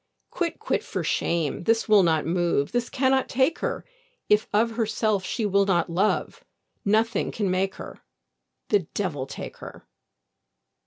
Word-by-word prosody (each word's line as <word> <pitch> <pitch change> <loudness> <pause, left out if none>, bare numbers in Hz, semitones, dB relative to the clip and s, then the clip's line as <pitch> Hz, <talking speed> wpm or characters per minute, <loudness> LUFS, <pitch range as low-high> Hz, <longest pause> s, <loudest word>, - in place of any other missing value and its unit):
Quit, 345 -2 -2
quit, - - -1
for - - -4
shame, 170 -1 -1
this 225 0 +2
will 210 -2 +6
not 160 -4 +2
move, 170 -3 0
This 240 0 -1
cannot 265 0 +1
take 265 +6 +1
her; - - -3 0.4
If 210 +1 +3
of 225 +3 +2
herself 220 -3 0
she 220 +3 -2
will 200 0 +2
not 175 -3 +1
love, 195 +5 0 0.4
Nothing 220 +2 +1
can 200 -4 -1
make 190 +1 0
her: - - -9 0.7
The 205 - +4 0.2
devil 150 -10 -2
take - - -8
her! - - -11
205 Hz, 150 wpm, -25 LUFS, 175-225 Hz, 0.7 s, will